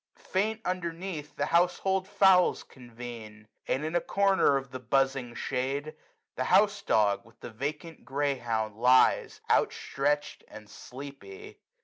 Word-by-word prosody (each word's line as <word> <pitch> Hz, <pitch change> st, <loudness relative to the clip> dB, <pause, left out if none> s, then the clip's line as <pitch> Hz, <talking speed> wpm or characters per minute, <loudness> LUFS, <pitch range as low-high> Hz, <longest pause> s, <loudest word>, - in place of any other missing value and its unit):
Faint, 215 Hz, +4 st, -1 dB
underneath, 170 Hz, -4 st, -4 dB
the -, -, -1 dB
household 185 Hz, +2 st, +1 dB
fowls 190 Hz, -2 st, +4 dB
convene 115 Hz, -3 st, -11 dB, 0.2 s
j -, -, +1 dB
23a -, -, +2 dB
And, 140 Hz, +4 st, -4 dB
in 160 Hz, +2 st, -3 dB
a 175 Hz, -, +3 dB
corner 195 Hz, -8 st, +3 dB
of 135 Hz, -2 st, -7 dB
the 130 Hz, -, -6 dB
buzzing 135 Hz, -1 st, 0 dB
shade. 140 Hz, +5 st, -3 dB, 0.4 s
The -, -, -2 dB
house -, -, +3 dB
dog, 100 Hz, -2 st, +2 dB
with 115 Hz, 0 st, -22 dB
the -, -, -8 dB
vacant 150 Hz, +7 st, -6 dB
greyhound, 120 Hz, -6 st, -2 dB
lies, 125 Hz, +2 st, +3 dB
Out -, -, +3 dB
stretch'd, 145 Hz, +2 st, -2 dB
and 105 Hz, -1 st, -12 dB
sleepy. 125 Hz, -3 st, -11 dB
135 Hz, 140 wpm, -28 LUFS, 120-170 Hz, 0.4 s, fowls